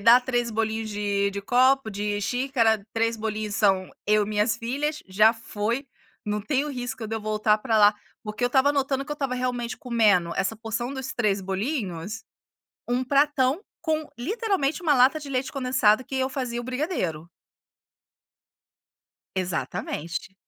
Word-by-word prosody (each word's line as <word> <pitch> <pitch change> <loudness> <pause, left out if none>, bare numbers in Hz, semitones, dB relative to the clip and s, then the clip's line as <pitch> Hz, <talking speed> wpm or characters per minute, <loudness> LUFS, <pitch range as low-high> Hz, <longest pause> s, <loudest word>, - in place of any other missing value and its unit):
dá 230 +4 +8
3 245 -2 -1
bolinhos 220 0 -1
de 205 -1 0
de 200 0 -4
copo, 255 +1 +3
de 205 0 -2
xícara. 230 -3 +1
3 230 0 +1
bolinhos 215 -1 -3
são 190 -3 +2 0.2
eu 210 0 +4
e - - -7
minhas 215 +2 +1
filhas. 285 +6 -2
Já 210 +4 +5
foi, 225 +4 -3 0.4
não 210 0 -1
tenho 280 +6 0
risco 245 -3 -5
de 225 - -4
eu - - -5
voltar 215 0 +2
para 225 0 0
lá. 210 0 +6 0.3
Porque 215 +2 -6
eu - - +5
estava 265 +3 +3
notando 275 -1 0
que 295 - -5
eu - - -2
estava 275 -3 -2
realmente 250 -1 -2
comendo, 210 -8 +2
essa 205 +3 0
porção 225 +3 -3
dos 265 -1 -5
3 210 -5 +1
bolinhos, 195 - -3 0.7
um 245 +1 +1
pratão 280 +2 +2 0.2
com, 315 -2 -1
literalmente, 375 - -1
uma 305 -4 +4
lata 265 +4 +4
de 290 - -8
leite 260 -1 -2
condensado 255 -4 +2
que 270 - -7
eu 260 0 +1
fazia 250 -3 -3
o - - -7
brigadeiro. 250 - -2 2.1
Exatamente. 175 -1 -3
235 Hz, 160 wpm, -25 LUFS, 210-265 Hz, 2.1 s, dá